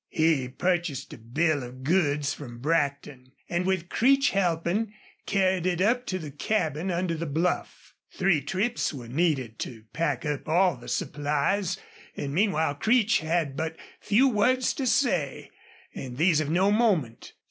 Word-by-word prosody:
He 155 -5 +2
purchased 175 +1 -1
a - - -9
bill 145 +7 0
of 125 +1 -9
goods 150 -3 +1
from 120 -6 -9
Brackton, 140 -2 -2
and, 175 +1 -1
with 185 -3 0
Creech 270 +5 +3
helping, 190 +3 0 0.3
carried 185 -2 +1
it 175 -2 0
up 240 +6 +2
to 185 - -1
the 155 -5 -7
cabin 160 +1 -1
under 175 -1 -1
the 165 0 -3
bluff. 165 +5 -2 0.2
Three 185 -6 +2
trips 195 - -1
were 130 -6 -8
needed 130 -5 0
to 110 -3 -6
pack 150 -5 -1
up 150 0 -3
all 180 +2 +3
the - - -13
supplies, 150 +6 -1 0.4
and 140 -1 -3
meanwhile 160 -5 +2
Creech 220 - +3
had 160 -3 -1
but 160 +1 -3 0.2
few 240 +7 +3
words 255 +2 +2
to 270 -3 -2
say, 180 - 0 0.4
and 125 -2 -7
these 160 0 +3
of 145 - -3
no 185 +5 +3
moment. 195 - +1
165 Hz, 155 wpm, -27 LUFS, 145-190 Hz, 0.4 s, Creech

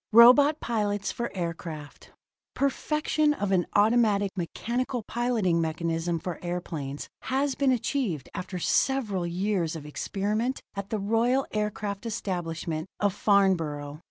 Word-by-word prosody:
ROBOT 265 +6 +8
PILOTS 205 -3 -1
FOR 235 0 -3
AIRCRAFT 165 -3 -5 0.5
Perfection 300 +2 +1
of 205 -5 -2
an 180 -2 +2
automatic 210 -2 +4
mechanical 235 - -2
piloting 225 -8 +1
mechanism 165 +1 -1
for 170 0 -5
airplanes 160 -5 -4 0.2
has 270 +1 +1
been 275 -1 +2
achieved 235 - -1
after 185 0 -5
several 205 -3 +1
years 180 -2 -1
of 155 -2 -7
experiment 210 - -2
at 200 0 -5
the 220 - -1
royal 230 +6 +2
aircraft 210 0 -2
establishment 175 -6 -3
of 205 -2 +2
Farnborough. 165 -8 +1
200 Hz, 120 wpm, -27 LUFS, 170-235 Hz, 0.5 s, ROBOT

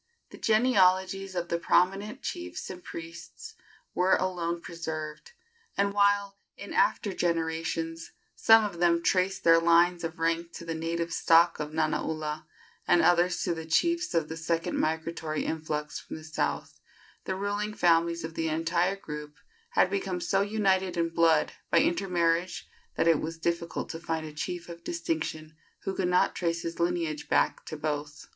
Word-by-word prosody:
The - - -12
genealogies 195 -4 +3
of 175 -1 -2
the 170 - 0
prominent 195 - +1
chiefs 345 - -5
and 180 -1 -10
priests 170 - -9 0.4
were 185 +1 +3
alone 175 -2 -1
preserved; 155 -3 -6 0.4
and 200 0 +1
while, 200 0 +2 0.2
in - - -8
after 210 - +2
generations, 165 -1 -2 0.2
some 225 -1 +6
of 175 -5 -5
them 170 -1 +3
traced 185 +1 +1
their 165 0 +6
lines 170 +1 +4
of 165 -1 -4
rank 165 +1 -1
to 170 - -8
the 165 - -3
native 165 +1 -2
stock 165 0 +4
of 150 0 -4
Nanaula, 155 0 -2 0.4
and 175 -1 +4
others 175 +1 +3
to 175 - 0
the 160 -1 -7
chiefs 340 - +1
of 165 -2 +2
the 160 - -6
second 165 +1 -1
migratory 160 -1 -2
influx 150 -2 -3
from - - -9
the 155 - -9
south, 160 0 -3 0.5
the 190 - -2
ruling 205 +2 -2
families 170 -1 +2
of 160 0 -5
the 160 0 -1
entire 170 +4 +1
group 150 -5 -8 0.4
had 185 - +3
become 195 -2 -2
so 195 +2 +1
united 190 -3 +1
in 165 0 +1
blood 165 -2 +3 0.2
by - - +3
intermarriage 175 -1 0 0.3
that - - +1
it 165 -3 +4
was 165 +1 -4
difficult 170 0 -2
to 165 - -5
find 160 -1 -3
a 155 - -8
chief 175 +3 -4
of 170 -1 -10
distinction 160 -2 -3 0.3
who 195 - -2
could 185 - 0
not 180 0 +3
trace 170 -1 -2
his 165 0 -5
lineage 170 -3 -1
back - - +2
to 155 - -5
both. 150 -1 -4
170 Hz, 165 wpm, -28 LUFS, 160-185 Hz, 0.5 s, some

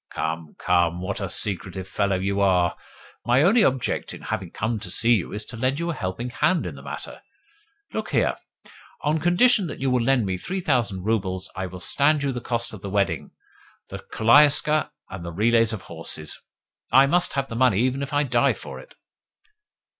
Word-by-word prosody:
"Come, 80 0 -4
come! 85 -1 +1
What 95 +3 -4
a 100 - -3
secretive 95 -1 -1
fellow 100 -2 0
you 100 +2 -1
are! 90 -3 +2 0.5
My 125 +4 +3
only 210 +7 +5
object 130 - -1
in - - -12
having 95 -2 -4
come 110 +5 -2
to 100 - -7
see 115 +6 +4
you 100 -7 0
is 105 +1 -5
to 115 - -8
lend 130 +4 0
you 170 0 -1
a - - -3
helping 105 +2 -4
hand 175 +8 +1
in - - -5
the - - -11
matter. - - -7 0.7
Look - - -3
here. - - +1 0.7
On 150 +2 +1
condition 190 +5 +4
that - - -7
you 135 -1 0
will 125 -1 +2
lend 125 -1 +2
me 95 -1 -2
three 190 - -4
thousand 120 - 0
roubles, 95 -4 -1
I 95 0 -3
will 90 0 -9
stand 145 - +2
you 140 - 0
the 120 -2 -5
cost 115 -1 -3
of 105 - -9
the 100 - -6
wedding, 100 0 -1 0.6
the - - -7
koliaska, 150 +5 +4 0.2
and 95 -2 -7
the 85 - -6
relays 115 +4 +2
of 110 -4 -5
horses. 80 -2 -5 0.6
I 135 +1 +7
must 175 +5 +1
have 135 -1 -1
the 115 - -7
money 120 -4 +3
even 130 +2 0
if 140 +2 -4
I 145 0 +2
die 120 -4 +2
for - - -9
it." - - -15
115 Hz, 200 wpm, -24 LUFS, 95-140 Hz, 0.7 s, I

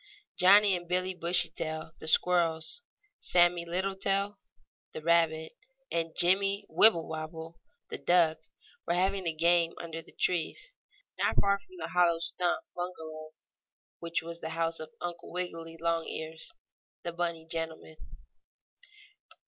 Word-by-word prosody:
Johnnie 200 +1 +6
and 175 -1 -6
Billie 185 +1 0
Bushytail, 170 -2 -2
the - - -8
squirrels; 165 - +1 0.4
Sammie 175 -1 +3
Littletail, 195 +3 0 0.6
the - - -6
rabbit, 160 -1 +2 0.4
and 165 -1 -1
Jimmie 195 +3 +3
Wibblewobble, 160 -4 +2 0.3
the - - -4
duck, 170 -3 +3 0.5
were 170 - +1
having 190 0 +1
a - - +2
game 170 +1 +3
under 165 -1 -6
the - - -17
trees, 180 - -1 0.5
not - - +1
far 200 0 +2
from 370 - -17
the - - -5
hollow 175 -2 +3
stump 175 +1 -1
bungalow 160 -3 -6 0.7
which 170 -1 -2
was 170 0 -8
the 160 - -4
house 165 0 0
of 155 - -7
Uncle 175 -1 -6
Wiggily 165 -2 -5
Longears, 165 - -3 0.5
the 170 - -4
bunny 170 -1 -3
gentleman. 165 -1 -5
170 Hz, 125 wpm, -30 LUFS, 165-180 Hz, 0.7 s, Johnnie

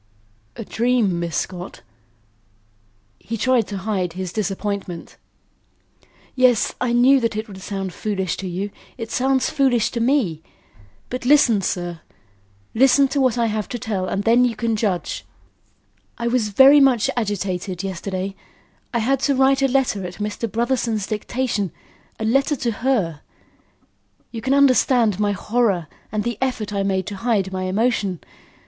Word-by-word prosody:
"A 230 - -7
dream, 230 -7 +1
Miss 170 -3 -2
Scott?" 180 0 -5 1.4
He 230 - -5
tried 250 -1 +2
to 200 - -5
hide 190 -3 -2
his 185 -1 -5
disappointment. 200 -3 -4 1.2
"Yes; 250 -4 +3
I 250 -1 +1
knew 250 +3 +5
that 230 -3 -1
it 215 +2 -3
would 190 -2 -11
sound 195 -2 -4
foolish 190 -2 -2
to 195 - -5
you; 190 +3 -4 0.3
it 225 -2 -6
sounds 265 0 +1
foolish 250 -6 +2
to 235 - -3
me. 230 - +1 0.7
But 250 0 -4
listen, 245 -6 +4
sir. 175 -2 -3 0.7
Listen 270 +3 +4
to 280 +1 0
what 255 -3 +2
I 235 - +2
have 215 -2 -2
to 245 - -3
tell 210 -6 -3
and 195 +2 -2
then 235 +3 +4
you 240 -2 +1
can 230 +1 -1
judge. 205 -5 -2 0.9
I 235 -1 -2
was 235 -3 +1
very 270 +8 +7
much 260 -5 +4
agitated 195 -4 -2
yesterday. 190 +1 -4 0.6
I 235 - 0
had 250 +4 +1
to 280 +1 +1
write 270 +1 +3
a 270 - +4
letter 255 -7 0
at 180 - -9
Mr. 210 +2 -4
Brotherson's 230 -3 0
dictation 215 -3 -2 0.5
a 220 - -2
letter 275 +6 +2
to 240 -3 -1
her. 205 - -1 1.1
You 230 - -6
can 265 +3 +1
understand 255 -6 +4
my 205 -1 +1
horror 210 -5 0 0.3
and 210 0 -1
the 235 -2 -3
effort 230 -6 -2
I 200 - 0
made 190 -2 0
to 205 - -6
hide 200 -4 0
my 185 0 -2
emotion. 200 -2 0
220 Hz, 155 wpm, -21 LUFS, 195-250 Hz, 1.4 s, very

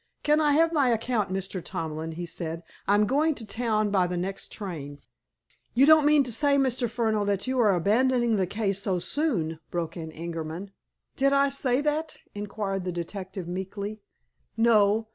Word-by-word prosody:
"Can 300 +1 +3
I 295 -1 +3
have 330 +2 +3
my 280 -5 +3
account, 230 -3 0
Mr. 190 -1 -4
Tomlin?" 160 0 -4
he 175 +2 -5
said. 165 0 -5 0.2
"I'm 205 +1 +4
going 295 +6 +2
to 230 - -7
town 215 -1 0
by 185 -3 +3
the 180 0 -3
next 190 +2 -4
train." 155 -9 -6 0.8
"You 260 +3 +6
don't 310 -1 +6
mean 300 -1 +5
to 245 - -4
say, 285 +3 +3
Mr. 255 -3 +1
Furneaux, 220 -2 0
that 200 -1 0
you 260 0 -1
are 210 -5 +4
abandoning 235 +5 +2
the 190 -2 +1
case 200 0 -1
so 190 -2 0
soon?" 175 - -1
broke 165 -2 -3
in 160 -2 -6
Ingerman. 165 +3 -6 0.4
"Did 275 +1 +2
I 280 0 +4
say 270 -1 +1
that?" 300 +2 -1 0.2
inquired 205 -2 -3
the 180 - -2
detective 185 +1 -6
meekly. 200 +4 -5 0.6
"No. 220 -1 +4
210 Hz, 175 wpm, -27 LUFS, 180-255 Hz, 0.8 s, You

